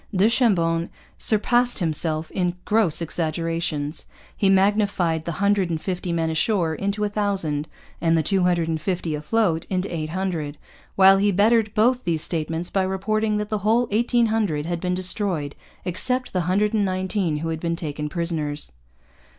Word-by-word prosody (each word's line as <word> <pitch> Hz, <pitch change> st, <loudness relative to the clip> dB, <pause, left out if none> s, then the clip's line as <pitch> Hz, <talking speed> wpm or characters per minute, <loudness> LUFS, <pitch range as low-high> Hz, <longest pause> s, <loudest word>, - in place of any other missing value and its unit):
Du 190 Hz, +3 st, +4 dB
Chambon 170 Hz, -9 st, +2 dB, 0.3 s
surpassed 240 Hz, +3 st, +2 dB
himself 160 Hz, -2 st, -1 dB
in 180 Hz, -2 st, -1 dB
gross 210 Hz, -7 st, +2 dB
exaggerations. 165 Hz, -2 st, -2 dB, 0.3 s
He 195 Hz, -, +2 dB
magnified 195 Hz, -4 st, +2 dB
the 170 Hz, -, -3 dB
hundred 200 Hz, +1 st, +1 dB
and 165 Hz, -2 st, -1 dB
fifty 180 Hz, 0 st, -3 dB
men 165 Hz, -1 st, 0 dB
ashore 165 Hz, 0 st, +1 dB
into 200 Hz, +5 st, -2 dB
a -, -, +2 dB
thousand, 190 Hz, -8 st, -1 dB, 0.3 s
and 165 Hz, -1 st, +3 dB
the 160 Hz, -, +2 dB
two 195 Hz, +4 st, +1 dB
hundred 175 Hz, -2 st, +2 dB
and 160 Hz, -1 st, -2 dB
fifty 175 Hz, -2 st, -2 dB
afloat 165 Hz, +2 st, 0 dB
into 185 Hz, -1 st, -2 dB
eight 155 Hz, -1 st, -3 dB
hundred; 170 Hz, -5 st, -3 dB, 0.4 s
while 195 Hz, 0 st, +7 dB
he 205 Hz, +1 st, +3 dB
bettered 215 Hz, +2 st, +3 dB
both 245 Hz, +4 st, +3 dB
these 165 Hz, -3 st, 0 dB
statements 165 Hz, +1 st, -2 dB
by 195 Hz, -, +1 dB
reporting 210 Hz, +3 st, 0 dB
that 210 Hz, 0 st, -3 dB
the 215 Hz, -, 0 dB
whole 225 Hz, +4 st, +2 dB
eighteen 235 Hz, +2 st, +2 dB
hundred 205 Hz, -10 st, 0 dB
had 170 Hz, 0 st, -2 dB
been 180 Hz, +1 st, -1 dB
destroyed 180 Hz, -5 st, -1 dB, 0.3 s
except 250 Hz, +8 st, -2 dB
the 185 Hz, -, +1 dB
hundred 210 Hz, +3 st, +2 dB
and 215 Hz, -2 st, +2 dB
nineteen 185 Hz, -3 st, -1 dB
who 165 Hz, +2 st, -3 dB
had 160 Hz, -1 st, -3 dB
been 170 Hz, 0 st, -1 dB
taken 150 Hz, -2 st, -4 dB
prisoners. 155 Hz, -, -3 dB
180 Hz, 165 wpm, -23 LUFS, 165-205 Hz, 0.4 s, while